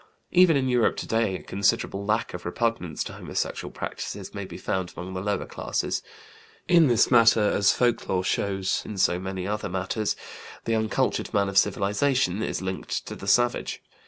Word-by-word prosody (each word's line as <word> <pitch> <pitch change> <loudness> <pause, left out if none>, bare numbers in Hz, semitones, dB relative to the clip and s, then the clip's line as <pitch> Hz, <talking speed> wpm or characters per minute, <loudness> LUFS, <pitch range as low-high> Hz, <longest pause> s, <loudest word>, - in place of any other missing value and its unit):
Even 180 -4 +6
in 130 -1 0
Europe 125 -2 +2
today 110 -4 0
a - - -7
considerable 100 0 0
lack 110 +2 0
of 90 - -6
repugnance 90 -4 -1
to - - -8
homosexual - - -4
practices - - -6
may - - -5
be - - -9
found 95 -2 -2
among 90 +1 -6
the 95 - -3
lower 105 +1 -1
classes. - - -2 0.7
In 170 -3 +6
this 120 -3 +3
matter, 115 -2 +6
as 100 -1 +4
folklore 115 -6 +1
shows 95 +1 0
in 105 - -7
so 90 -1 +2
many 95 0 -4
other 105 +1 -2
matters, 95 +4 -1 0.5
the 115 - 0
uncultured 110 -2 0
man 100 -1 +2
of 95 - -3
civilization 105 +1 +1
is 95 - -2
linked 95 0 -3
to - - -6
the 95 - -9
savage. 120 +4 +1
100 Hz, 170 wpm, -26 LUFS, 95-115 Hz, 0.7 s, Even